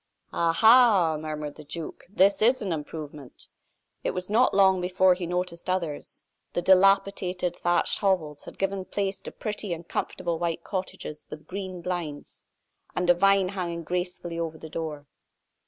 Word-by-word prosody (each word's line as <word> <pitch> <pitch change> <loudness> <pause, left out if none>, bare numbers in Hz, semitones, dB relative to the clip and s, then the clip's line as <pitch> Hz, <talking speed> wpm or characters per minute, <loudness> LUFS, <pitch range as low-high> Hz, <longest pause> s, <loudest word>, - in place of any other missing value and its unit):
"Ah, 170 -1 +2
ha!" 220 -5 +6
murmured 150 -1 -5
the 155 - -10
duke, 155 +2 -7
"this 200 +1 +3
is 245 +4 +4
an 190 -4 -1
improvement!" 150 -3 -8 0.6
It - - -1
was 180 +2 -4
not 240 +4 +4
long 190 -2 +4
before 185 +1 +4
he 180 -1 -4
noticed 180 0 -3
others. 170 -5 -3 0.3
The - - 0
dilapidated, 190 -1 +3
thatched 175 0 +1
hovels 165 -8 0
had - - -11
given 195 0 -1
place 195 -1 -2
to - - -8
pretty 210 -3 -4
and 170 0 -8
comfortable 170 -2 -3
white 170 0 -2
cottages 185 -5 -5
with 155 0 -9
green 185 -2 -6
blinds, 170 -5 -5 0.5
and 180 -1 +3
a - - +7
vine 195 +1 +3
hanging 175 -3 -4
gracefully 175 0 -3
over 160 -1 -3
the 160 - -10
door. 155 -3 -5
180 Hz, 155 wpm, -26 LUFS, 165-190 Hz, 0.6 s, a